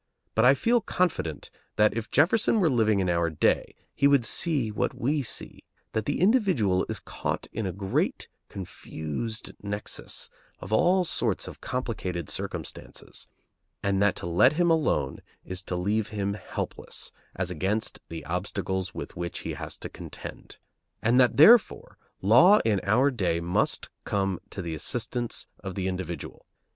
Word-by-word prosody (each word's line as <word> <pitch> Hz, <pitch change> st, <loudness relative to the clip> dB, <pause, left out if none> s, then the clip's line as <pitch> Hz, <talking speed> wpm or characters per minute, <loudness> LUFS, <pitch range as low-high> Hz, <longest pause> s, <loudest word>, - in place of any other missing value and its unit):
But 110 Hz, -, +3 dB
I 135 Hz, +2 st, +7 dB
feel 235 Hz, -, +2 dB
confident 150 Hz, -, -1 dB, 0.2 s
that 105 Hz, 0 st, +4 dB
if 115 Hz, -1 st, -3 dB
Jefferson 200 Hz, -, +3 dB
were 170 Hz, -6 st, +3 dB
living 110 Hz, -4 st, +3 dB
in 95 Hz, -, 0 dB
our 85 Hz, -1 st, +2 dB
day 80 Hz, -, +1 dB, 0.2 s
he 140 Hz, -, +4 dB
would 140 Hz, -4 st, +4 dB
see 135 Hz, -4 st, +1 dB
what 105 Hz, -, -1 dB
we 145 Hz, +4 st, +1 dB
see: 125 Hz, -, -3 dB, 0.3 s
that 110 Hz, -, -1 dB
the 145 Hz, -, 0 dB
individual 185 Hz, -, +3 dB
is -, -, -3 dB
caught -, -, -4 dB
in 110 Hz, -3 st, -2 dB
a -, -, -2 dB
great 95 Hz, +2 st, -1 dB, 0.2 s
confused 95 Hz, +3 st, -5 dB
nexus 105 Hz, +1 st, -3 dB, 0.3 s
of 95 Hz, -, -6 dB
all 180 Hz, +8 st, +4 dB
sorts 120 Hz, -, 0 dB
of -, -, -10 dB
complicated 95 Hz, -, -3 dB
circumstances, -, -, -5 dB, 0.6 s
and 100 Hz, -1 st, +1 dB
that 100 Hz, -2 st, +3 dB
to -, -, -5 dB
let 90 Hz, -, +4 dB
him 170 Hz, +1 st, +3 dB
alone 75 Hz, -, +1 dB, 0.3 s
is 90 Hz, 0 st, -6 dB
to 90 Hz, -, -3 dB
leave 100 Hz, +4 st, 0 dB
him 100 Hz, -2 st, -2 dB
helpless 105 Hz, -, -4 dB, 0.2 s
as 90 Hz, -1 st, -2 dB
against 95 Hz, +6 st, -1 dB
the 80 Hz, -3 st, -7 dB
obstacles 95 Hz, +2 st, -3 dB
with -, -, -6 dB
which 85 Hz, 0 st, -4 dB
he -, -, -4 dB
has -, -, -6 dB
to -, -, -6 dB
contend; -, -, -9 dB, 0.5 s
and 120 Hz, +3 st, +4 dB
that, 125 Hz, -1 st, +4 dB
therefore, 220 Hz, +10 st, +6 dB, 0.2 s
law 125 Hz, -, +7 dB
in 105 Hz, -4 st, +2 dB
our 125 Hz, +8 st, +3 dB
day 95 Hz, -9 st, 0 dB
must 85 Hz, +1 st, 0 dB, 0.2 s
come 95 Hz, -3 st, -1 dB
to 95 Hz, -, -5 dB
the 85 Hz, -1 st, -4 dB
assistance 120 Hz, +8 st, -2 dB
of 95 Hz, -2 st, -6 dB
the 95 Hz, -1 st, -1 dB
individual. 90 Hz, -4 st, -5 dB
105 Hz, 155 wpm, -27 LUFS, 90-130 Hz, 0.6 s, I